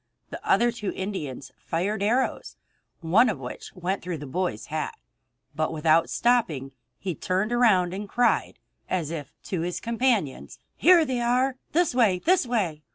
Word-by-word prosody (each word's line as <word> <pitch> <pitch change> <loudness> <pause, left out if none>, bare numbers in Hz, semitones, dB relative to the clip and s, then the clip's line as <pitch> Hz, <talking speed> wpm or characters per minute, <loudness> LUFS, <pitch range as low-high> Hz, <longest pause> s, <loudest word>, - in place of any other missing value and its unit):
The - - -7
other 240 0 +3
two 225 -4 -4
Indians 170 -10 -5
fired 195 +5 -2
arrows, 235 +6 0 0.4
one 195 +9 +4
of 210 - -2
which 125 -1 -8
went 185 +2 -2
through 175 -1 -4
the 145 - -8
boy's 175 - -2
hat; - - -2 0.6
but 155 +1 0
without 160 +1 +3
stopping, 195 - +1 0.3
he 185 -3 -3
turned 185 - -1
around 205 -8 +3
and 200 +1 -6
cried, 245 +2 +1 0.3
as 170 -4 -1
if 150 -5 -6
to 180 -4 -3
his 175 +1 -2
companions: 230 - -1 0.2
"Here 350 -3 +6
they 260 -3 -1
are! 250 +2 +2 0.2
This 340 -2 +2
way! 225 -7 +3
This 335 - +2
way!" 190 -11 -1
195 Hz, 160 wpm, -26 LUFS, 165-240 Hz, 0.6 s, Here